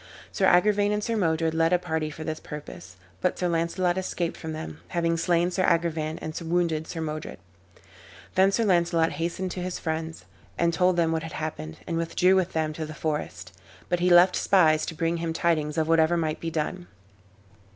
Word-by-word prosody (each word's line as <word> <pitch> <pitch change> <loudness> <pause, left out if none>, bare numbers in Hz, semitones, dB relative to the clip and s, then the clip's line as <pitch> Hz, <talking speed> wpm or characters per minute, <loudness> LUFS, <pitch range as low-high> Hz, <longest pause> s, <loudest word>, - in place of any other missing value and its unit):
Sir 190 - +2
Agrivain 205 +3 +4
and 210 0 -1
Sir 230 - -1
Modred 165 -5 +1
led 165 +1 +2
a 180 - +5
party 160 -3 -2
for 155 +1 -8
this 155 0 -4
purpose, 90 - -9 0.3
but - - 0
Sir 180 - 0
Launcelot 175 +2 0
escaped 175 -2 -3
from 160 - -6
them, 155 0 -7
having 170 -1 0
slain 175 +1 +1
Sir 185 +1 0
Agrivain 165 -3 0
and 155 - -4
wounded 165 -2 0
Sir 165 - -5
Modred. 155 -1 -5 1.0
Then 190 +1 +4
Sir 230 - +1
Launcelot 170 -3 +2
hastened 175 +3 -3
to 180 - -5
his 180 0 -3
friends, 160 0 -4 0.3
and 170 0 +2
told 180 +2 +3
them 165 -1 +2
what 160 0 0
had 165 -1 -7
happened, 150 - -5
and 165 - -2
withdrew 175 +3 +2
with 185 -1 +1
them 155 -1 -1
to 155 0 -4
the 155 - -8
forest; 95 - -4 0.4
but 175 - +1
he 180 +1 +2
left 180 +1 +6
spies 160 -5 +3
to 165 - -5
bring 165 +1 0
him 165 -1 -2
tidings 155 -3 0
of 160 -1 +1
whatever 165 +1 +3
might 155 -2 -1
be 165 - -3
done. 170 +3 -3
165 Hz, 195 wpm, -26 LUFS, 160-180 Hz, 1.0 s, left